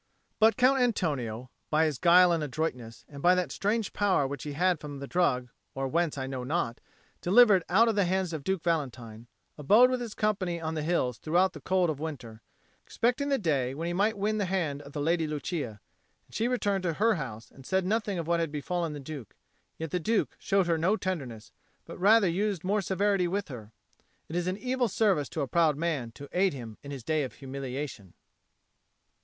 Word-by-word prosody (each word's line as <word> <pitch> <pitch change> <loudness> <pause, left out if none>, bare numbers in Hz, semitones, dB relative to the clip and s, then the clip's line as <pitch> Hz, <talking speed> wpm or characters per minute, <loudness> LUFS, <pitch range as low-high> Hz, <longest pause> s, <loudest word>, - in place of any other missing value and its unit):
But 220 +1 +5
Count 260 +1 +4
Antonio 150 - 0
being, 130 - -14 0.2
by 155 +1 +3
his 150 -5 -2
guile 180 0 +6
and 165 -2 +1
adroitness, 125 -6 -4
and 140 -1 -10
by 180 +3 +5
that 180 -1 -1
strange 210 +1 -1
power 195 -8 +2
which 140 0 -5
he 150 - -5
had 180 +2 +1
from 145 -2 -7
the 140 - -6
drug 130 -7 +1 0.3
or 135 0 -2
whence 165 +1 0
I 135 - -3
know 130 -1 -5
not, 130 -4 -2 0.4
delivered 200 -1 +6
out 215 +7 +5
of 225 - +2
the 200 -2 +2
hands 185 -1 0
of 155 -3 -4
Duke 190 +1 -1
Valentine, 125 -9 -3 0.3
abode 215 - +6
with 255 -1 -1
his 230 -3 -6
company 195 -5 -1
on 160 -1 -3
the 155 - -2
hills 150 -7 0
throughout 180 +4 +2
the - - -10
cold 185 -3 +1
of 145 - -6
winter, 125 -8 -7 0.4
expecting 250 +5 0
the 275 - +2
day 135 - 0
when 165 +3 -4
he 175 - -2
might 205 +4 +1
win 215 +2 0
the 200 - +1
hand 165 -7 -1
of 140 0 -13
the 145 - -3
Lady 165 +1 +1
Lucia; 150 - -4 0.5
and - - -24
she 225 - 0
returned 205 -6 0
to 175 -2 -1
her 220 +7 +3
house, 120 - -6
and 135 - -15
said 190 +6 0
nothing 210 -1 0
of 165 - -3
what 170 +1 +1
had 165 -3 -1
befallen 165 +2 -2
the 145 - -6
Duke. 140 -4 -9 0.4
Yet 160 -2 -5
the 180 - 0
Duke 215 +5 0
showed 195 -1 +2
her 165 -1 +1
no 190 +7 +2
tenderness, 135 - -5 0.3
but - - -10
rather 205 +2 +5
used 195 +1 -1
more 200 +3 +1
severity 195 0 +1
with 200 +1 -2
her. 110 -5 -9 0.6
It 160 - -5
is 175 0 -1
an 185 +1 -1
evil 255 +1 0
service 195 - +1
to 160 - -3
a 140 - -1
proud 160 -1 +2
man 150 -7 -2
to 140 +5 -10
aid 185 0 +2
him 115 -4 -9
in 140 - -10
his 135 -4 -7
day 155 +4 0
of 130 - -4
humiliation. 135 -7 -6
170 Hz, 215 wpm, -29 LUFS, 140-195 Hz, 0.6 s, guile